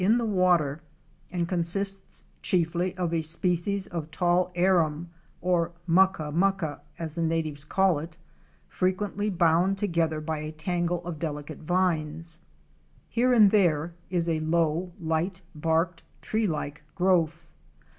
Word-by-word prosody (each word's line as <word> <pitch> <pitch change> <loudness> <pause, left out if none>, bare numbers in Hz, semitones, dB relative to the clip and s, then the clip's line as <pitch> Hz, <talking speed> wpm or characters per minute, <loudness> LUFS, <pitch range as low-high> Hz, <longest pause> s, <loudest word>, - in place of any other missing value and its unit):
in 215 +5 +4
the 235 - 0
water 175 -7 +2 0.5
and 175 -1 -1
consists 195 +3 -2 0.2
chiefly 175 +1 0
of 175 -2 -1
a 165 - +1
species 175 +4 +1
of 165 -4 -5
tall 180 +2 +1
Arum, 170 -3 +2 0.3
or 170 -1 +1
mucka 175 -3 +3
mucka, 175 -4 0 0.2
as 160 -2 -5
the 170 - -3
natives 160 -3 0
call 185 0 +2
it, 165 +2 -9 0.5
frequently 200 +3 -1
bound 175 +1 +3
together 165 -6 0
by 155 0 -3
a 155 0 -5
tangle 175 +2 -2
of 170 -3 -5
delicate 150 -2 -5
vines. 165 -2 0 0.7
Here 250 +2 +2
and 215 -5 +6
there 170 -5 +2 0.2
is 175 -2 0
a 160 -2 +1
low, 165 +2 0
light 170 +3 -2
barked 165 +2 0 0.2
tree 220 0 0
like 150 -3 -4
growth. 175 -3 +2
170 Hz, 135 wpm, -27 LUFS, 160-185 Hz, 0.7 s, and